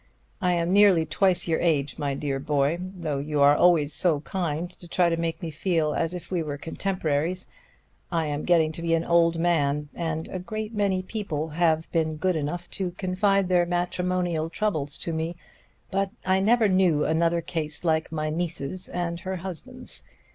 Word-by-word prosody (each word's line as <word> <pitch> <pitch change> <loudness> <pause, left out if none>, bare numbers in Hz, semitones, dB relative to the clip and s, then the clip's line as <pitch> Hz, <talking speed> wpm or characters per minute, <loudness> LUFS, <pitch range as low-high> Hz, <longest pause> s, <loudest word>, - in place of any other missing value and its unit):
I 180 -2 +2
am 170 +1 +1
nearly 195 -5 +6
twice 180 +2 +1
your 165 - +1
age, 150 -4 0
my 140 -2 -1
dear 140 -1 -2
boy, 145 +3 +1
though 175 -6 -4
you 150 +1 -2
always 150 +1 +5
so 160 -5 +2
kindly 175 +2 -4
try 175 0 +2
to 165 - +1
make 165 0 -3
me 165 - -3
feel 155 -1 0
as 165 +3 -1
if 180 - -9
we 180 -2 0
were 145 -2 -4
contemporaries 165 +1 -2 0.7
I 165 -2 +1
am 145 0 -3
getting 165 -3 +3
to 165 - -7
be 165 0 +2
an 165 - 0
old 170 -1 +3
man, 150 -4 +1
and 160 -1 -3
a 185 - -4
great 215 +4 -5
many 195 -3 +1
people 180 -7 -3
have 160 0 +1
been 160 -2 0
good 180 +3 0
enough 160 +4 -3
to 180 -2 -1
confide 195 +1 +1
their 175 -1 +3
matrimonial 175 -2 -1
troubles 160 -7 -2
to 170 - -4
me; 160 +2 -2 0.6
but 195 0 0 0.2
I 190 0 +3
never 220 +3 +4
knew 185 -6 +3
another 170 +1 +2
case 160 -2 -4
like 160 -2 +1
my 155 -1 -2
niece's 170 +1 -3
and 170 -1 -3
her 190 +1 -4
husband's. 195 +8 -4
170 Hz, 175 wpm, -26 LUFS, 155-185 Hz, 0.7 s, nearly